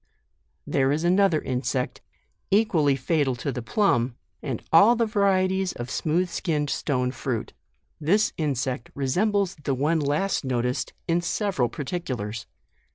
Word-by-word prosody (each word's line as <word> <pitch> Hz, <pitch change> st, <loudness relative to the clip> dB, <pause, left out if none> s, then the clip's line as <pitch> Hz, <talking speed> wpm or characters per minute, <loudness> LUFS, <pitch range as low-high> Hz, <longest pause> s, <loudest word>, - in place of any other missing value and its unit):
There 135 Hz, -1 st, +1 dB
is 155 Hz, +3 st, 0 dB
another 180 Hz, -2 st, +3 dB
insect, 130 Hz, -1 st, -2 dB, 0.5 s
equally 175 Hz, -9 st, +3 dB
fatal 135 Hz, -1 st, 0 dB
to 130 Hz, +4 st, -3 dB
the 125 Hz, -, -4 dB
plum, 120 Hz, -, +1 dB, 0.3 s
and 130 Hz, -6 st, -4 dB
all 205 Hz, +9 st, +7 dB
the 230 Hz, 0 st, +2 dB
varieties 190 Hz, -3 st, +1 dB
of 120 Hz, +1 st, -6 dB
smooth 175 Hz, +3 st, 0 dB
skinned 155 Hz, -5 st, -1 dB
stone 125 Hz, -3 st, 0 dB
fruit. 125 Hz, -3 st, -4 dB, 0.5 s
This 190 Hz, +8 st, +2 dB
insect 130 Hz, -5 st, -2 dB
resembles 190 Hz, +8 st, +1 dB
the 135 Hz, -, 0 dB
one 155 Hz, +5 st, +1 dB
last 150 Hz, +7 st, 0 dB
noticed, 125 Hz, -1 st, -1 dB
in 170 Hz, 0 st, +2 dB
several 175 Hz, -, 0 dB
particulars. 130 Hz, -, -4 dB
150 Hz, 130 wpm, -25 LUFS, 130-185 Hz, 0.5 s, all